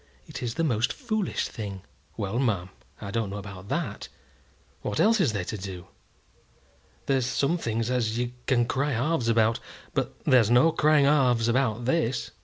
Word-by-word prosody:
It - - -8
is 120 -2 -3
the 165 - 0
most 120 -3 +1
foolish 215 - -2
thing." 100 -4 -7 0.3
"Well, 105 +2 -2
ma'am, 100 -9 0 0.3
I 100 - -6
don't 115 -2 -1
know 100 - -5
about 100 -1 -9
that. - - -3 0.7
What 105 - -3
else 225 -1 +4
is 145 -10 +3
they 100 -4 -2
to 105 +3 -5
do? 95 -2 -7 1.2
There's 135 -3 +1
some 140 +6 +1
things 115 -2 -1
as 115 -3 0
you 120 0 -1 0.2
can 120 -3 +3
cry 140 +4 0
halves 125 0 0
about, 115 0 +3 0.3
but - - -2
there's 120 -5 +5
no 125 +7 +5
crying 155 -2 +4
halves 125 -6 +3
about 120 -2 +1
this." 130 -2 0
120 Hz, 170 wpm, -27 LUFS, 110-140 Hz, 1.2 s, there's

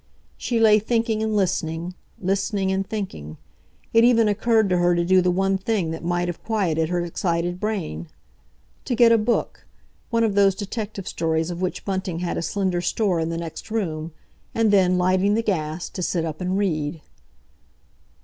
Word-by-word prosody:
She 235 -2 -1
lay 215 -1 +6
thinking 225 0 0
and 220 -1 0
listening—listening 190 +2 -2
and 190 0 -2
thinking. 80 - -5 0.6
It 230 0 +6
even 230 -2 +5
occurred 220 +1 +2
to 180 - +3
her 175 0 +3
to 170 0 +1
do 185 +1 +5
the 180 - +2
one 195 +2 +1
thing 195 -5 -1
that 160 - -6
might 175 +1 0
have 175 - -5
quieted 170 -8 0
her 175 -1 -1
excited 175 0 -2
brain—to 185 - -6
get 235 -1 +6
a 230 - +6
book, 230 +2 -1 0.4
one 230 -1 +2
of 220 -3 +1
those 195 -1 +4
detective 205 -1 -5
stories 160 +1 -1
of 175 +1 -6
which 185 - -3
Bunting 190 -3 -2
had 175 0 -2
a - - -2
slender 185 0 -1
store 180 0 0
in 160 0 -1
the 165 - -3
next 170 +5 -7
room, 165 -7 -3 0.4
and 225 -2 +3
then, 185 -2 +4
lighting 185 +3 +2
the 230 - 0
gas, 160 -4 -2
to 185 - -6
sit 170 -1 -1
up 155 +2 -5
and 180 +1 -1
read. 160 -5 -1
185 Hz, 175 wpm, -23 LUFS, 170-210 Hz, 0.6 s, lay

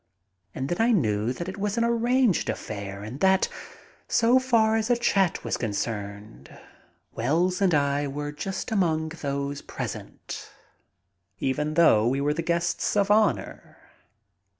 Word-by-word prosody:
And 135 - -3
then 175 +7 -1
I 235 +2 +4
knew 110 - +1
that 170 +7 -5
it 190 - -6
was 205 +2 -1
an 230 - +2
arranged 235 - +2
affair 100 -2 -5
and 115 +6 -7
that, 190 +1 +4 0.6
so 240 +3 +4
far 230 -4 +3
as 225 +1 0
a 245 - +3
chat 195 -6 +1
was - - -2
concerned, 100 - -5 0.6
Wells 170 - 0
and 185 -5 +3
I 140 0 +1
were 145 +1 -4
just 190 +9 -5
among 160 -6 +1
those 140 -3 -4
present, - - -7 0.9
even 150 +6 -1
though 115 -10 +5
we 135 +3 +1
were 145 +1 +1
the 165 - -2
guests 170 +4 0
of 200 0 +2
honor. 215 0 0
160 Hz, 145 wpm, -26 LUFS, 130-205 Hz, 0.9 s, though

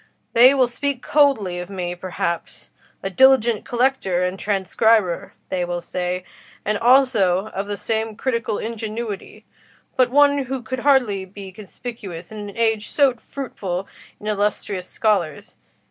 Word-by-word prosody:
They 250 +4 +7
will 260 -2 +4
speak 265 +2 -3
coldly 260 -12 +2
of 180 +1 -6
me, 180 -3 -3
perhaps: 170 - -4 0.3
'a 195 - -3
diligent 240 0 +4
collector 240 -8 +1
and 180 +1 -2
transcriber,' 200 -1 +1 0.2
they 180 -1 -1
will 175 0 -2
say, 180 +1 -3 0.4
'and 210 0 0
also 225 -7 +4
of 200 +1 -4
some 220 +1 -2
critical 230 -3 -1
ingenuity, 220 -2 -5 0.5
but 255 -2 +4
one 285 +1 +4
who 260 0 -4
could 260 +3 -4
hardly 245 -8 +3
be 195 0 -10
conspicuous 195 -3 -8
in 215 - -7
an 200 - -12
age 225 -2 +1
so 280 -3 +3
fruitful 200 -7 -5 0.3
in - - -12
illustrious 205 -2 -1
scholars. 190 -9 -1
215 Hz, 135 wpm, -22 LUFS, 185-245 Hz, 0.5 s, They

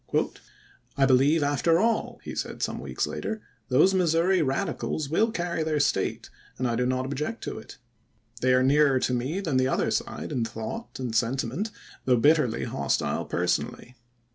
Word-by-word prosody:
" - - -30
I 135 - +5
believe 135 +4 +4
after 145 +4 +2
all," 225 +4 0
he - - -6
said - - -4
some - - -2
weeks - - -2
later, 220 0 -4 0.2
" - - -41
those 150 +9 +5
Mis 175 -4 +2
souri 175 +1 +3
Radicals 145 0 -2
will 220 +8 +3
carry 175 -6 -2
their 155 -1 0
State, 145 - 0 0.3
and 130 - 0
I 120 - 0
do 125 +1 +1
not 130 0 0
object 150 - -4
to - - -4
it. - - -12 0.6
They 130 0 +4
are 130 - +4
nearer 140 0 +4
to 125 - 0
me 135 +10 -1
than 160 -9 0
the 130 0 +3
other - - 0
side - - -3
in 120 - 0
thought 115 - -6
and 125 -3 -3
sentiment, 130 - 0 0.4
though 125 -1 +4
bit 150 +8 +5
terly 125 -7 -1
hostile - - -1
personally. 125 - -2
140 Hz, 185 wpm, -26 LUFS, 130-170 Hz, 0.6 s, I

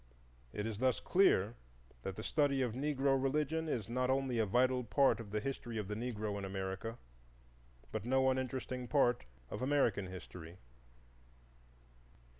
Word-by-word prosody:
It 105 - -3
is 110 -2 -3
thus 130 0 +2
clear 115 - +3 0.5
that 95 +8 -4
the 110 - -6
study 140 -1 +2
of 120 -3 -1
Negro 135 0 +1
religion 150 +4 0
is 110 -8 -1
not 125 +2 0
only 130 -3 +1
a 110 - +2
vital 125 +4 +3
part 115 +1 +3
of 110 -3 -7
the 105 +1 -1
history 120 -1 -4
of 105 -3 -3
the 105 - -3
Negro 110 -3 -3
in - - -6
America, 95 +4 -4 0.9
but - - -3
no 130 +2 +3
uninteresting 130 -1 -3
part 125 -4 +3 0.3
of - - -4
American 130 -8 +2
history. 90 -2 -9
125 Hz, 150 wpm, -35 LUFS, 105-135 Hz, 0.9 s, clear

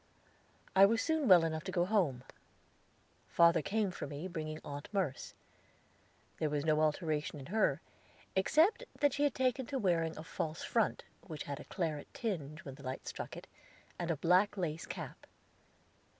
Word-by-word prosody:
I 195 +1 +9
was 225 +2 +2
soon 315 +1 +1
well 180 -4 +8
enough 160 -1 -2
to 190 - -3
go 175 -1 +2
home. 175 - +1 1.0
Father 170 -1 +5
came 200 +2 0
for 180 - -6
me, 145 +5 -5
bringing 155 -3 -5
Aunt 145 0 -6
Merce. 185 -10 -2 1.0
There 155 - +1
was 145 0 -1
no 155 -1 +3
alteration 155 -1 0
in 135 - -9
her, 220 - +2 0.5
except 315 - +3 0.2
that 290 -2 +3
she 290 +1 +2
had 285 - +1
taken 255 -1 +1
to 275 - -2
wearing 170 -7 +1
a 155 - -6
false 160 0 -4
front, 230 -3 +1 0.2
which 155 -5 -5
had 140 -1 -5
a - - -10
claret 160 -6 -3
tinge 155 - -4
when 135 - -6
the 140 - -13
light 130 0 -5
struck - - -6
it, - - -9 0.5
and 175 -1 -2
a 165 - +1
black 185 +7 +3
lace 165 -4 -3
cap. - - -7
170 Hz, 170 wpm, -34 LUFS, 155-205 Hz, 1.0 s, I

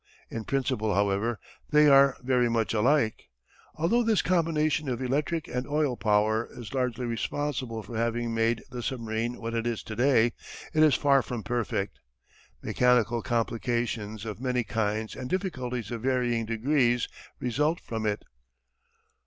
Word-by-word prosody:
In 115 -2 -5
principle, 110 -6 0
however, 100 +3 +1 0.3
they 150 0 +6
are 140 -1 +6
very 125 -2 +2
much 115 -1 0
alike. 115 - +1 0.5
Although 180 +10 +2
this 225 -3 +2
combination 155 -4 +1
of 120 -2 -2
electric 145 +5 -1
and 125 +1 -3
oil 145 -3 +1
power 110 +1 +1
is 120 -1 -8
largely 125 -2 -1
responsible 120 -1 -3
for 120 - -9
having 115 +1 -1
made 115 0 +1
the 125 -1 -5
submarine 115 -1 -3
what 115 0 -4
it 115 0 -1
is 115 -2 -2
to 110 - -7
day, 120 -2 +3 0.4
it 155 - +3
is 155 -3 +6
far 140 -2 +4
from 120 -3 -5
perfect. 110 -4 -2 0.6
Mechanical 120 -1 +2
complications 115 -2 -2
of 110 +1 -6
many 125 -2 0
kinds 110 -1 -2
and 125 -1 -6
difficulties 125 - -3
of 115 -2 -4
varying 120 -3 0
degrees 120 +1 +2 0.3
result 150 +7 0
from 110 -1 -4
it. 105 -1 -1
120 Hz, 145 wpm, -28 LUFS, 115-135 Hz, 0.6 s, they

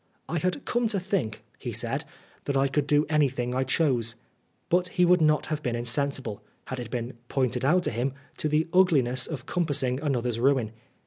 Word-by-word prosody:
" - - -43
I 170 - -1
had 185 - -2
come 240 -1 +1
to 210 -3 0
think," 175 - -2 0.2
he - - -4
said, - - -2 0.2
" - - -30
that 140 -1 0
I 135 +1 +3
could 140 +1 0
do 150 +1 +4
anything 135 -5 +1
I 130 +1 +1
chose." 125 -5 +1 0.5
But 180 +1 +2
he 180 -1 +2
would 180 0 +5
not 155 -1 +3
have 155 -1 -3
been 120 -4 -1
insensible, 120 -2 -1 0.2
had 130 - -5
it 120 -2 -6
been 120 0 -3 0.2
pointed 125 -2 0
out 175 +7 +3
to - - 0
him, 125 +4 -1 0.2
to 155 - -1
the 155 +2 +2
ugliness 135 -9 +3
of 140 -6 -6
compassing 140 -7 0
another's 125 -6 -1
ruin. 130 -4 +2
140 Hz, 200 wpm, -27 LUFS, 125-160 Hz, 0.5 s, would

